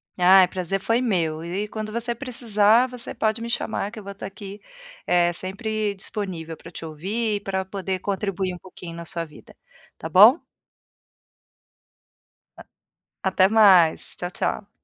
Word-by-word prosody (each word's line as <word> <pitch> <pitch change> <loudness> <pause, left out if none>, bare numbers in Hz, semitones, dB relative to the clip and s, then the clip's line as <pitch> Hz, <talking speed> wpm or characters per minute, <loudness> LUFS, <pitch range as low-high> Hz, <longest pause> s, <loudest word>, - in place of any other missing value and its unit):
Ai, 185 +1 +7
o - - -11
prazer 185 +1 -2
foi 230 +5 +1
meu 165 -9 -1
e 185 +5 -3
quando 215 0 -6
você 235 +1 -1
precisar, 235 -2 +2
você 250 -1 -7
pode 220 +1 -1
me 235 - -5
chamar 215 -3 -2
que 220 - -9
eu - - -11
vou 200 0 -8
tá 195 - -8
aqui, 195 +1 -9 0.4
eh, 175 -1 +3
sempre 205 +3 -3
disponível 185 -5 -5
pra 170 - -13
te 165 - -8
ouvir 205 +8 -2
e - - -2
pra 190 -1 -3
poder 190 -1 -4
contribuir 195 -1 -2
um - - -7
pouquinho 175 -2 -11
na 170 - -8
sua 170 0 -3
vida, 150 -2 -16 0.4
tá 160 - -6
bom? 215 - +8 2.2
A - - -10 0.7
até 185 0 +4
mais, 195 -7 +4
tchau, 175 - -4
tchau. 205 +2 -3
195 Hz, 160 wpm, -23 LUFS, 180-215 Hz, 2.2 s, bom